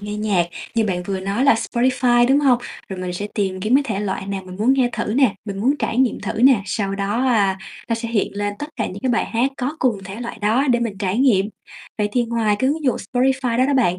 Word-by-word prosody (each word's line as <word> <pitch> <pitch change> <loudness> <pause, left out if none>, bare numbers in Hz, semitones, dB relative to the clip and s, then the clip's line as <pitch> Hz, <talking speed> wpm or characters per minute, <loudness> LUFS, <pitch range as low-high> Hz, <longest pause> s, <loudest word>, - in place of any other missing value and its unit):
nghe 205 +1 -5
nhạc 200 -5 +1 0.3
như 225 -1 +2
bạn 180 -3 -1
vừa 190 0 -3
nói 200 +7 -1
là 280 -4 +6
Spotify, 240 +1 +2
đúng 280 +2 +4
hông? 260 -4 +4 0.3
Rồi 190 -1 -6
mình 180 -1 -3
sẽ 205 +3 -4
tìm 190 -3 -1
kiếm 215 +6 +1
cái 285 - +5
thể 210 -5 -2
loại 195 0 -3
nào 195 -1 -4
mình 185 0 -9
muốn 225 +6 +3
nghe 260 -2 +2
thử 220 -1 -2
nè, 255 -7 +3
mình 200 -2 -5
muốn 270 +6 +3
trải 225 - -2
nghiệm 260 -2 +2
thử - - -3
nè, 255 -6 +6
sau 195 +1 -2
đó, 200 +4 -1
a, 200 -6 +2 0.3
nó 230 - +1
sẽ 230 0 -4
hiện 215 -3 -1
lên 205 0 -2
tất 295 - -4
cả 220 - -1
những 195 - -7
cái 260 - +1
bài 230 - +1
hát 240 +4 0
có 275 +5 -3
cùng 235 -6 +1
thể 195 +4 -8
loại 235 -2 -6
đó 230 +7 +2
để 240 0 +2
mình 210 -5 -3
trải 200 +2 -1
nghiệm. 210 -8 +4 0.5
Vậy 210 - +1
thì 245 -1 +2
ngoài 225 -3 0
cái 260 +4 +2
ứng 310 0 -3
dụng 255 - +2 0.2
Spotify 255 -1 +1
đó 255 - +4
đó 285 - +1
bạn, 185 -9 +2
225 Hz, 265 wpm, -21 LUFS, 200-255 Hz, 0.5 s, là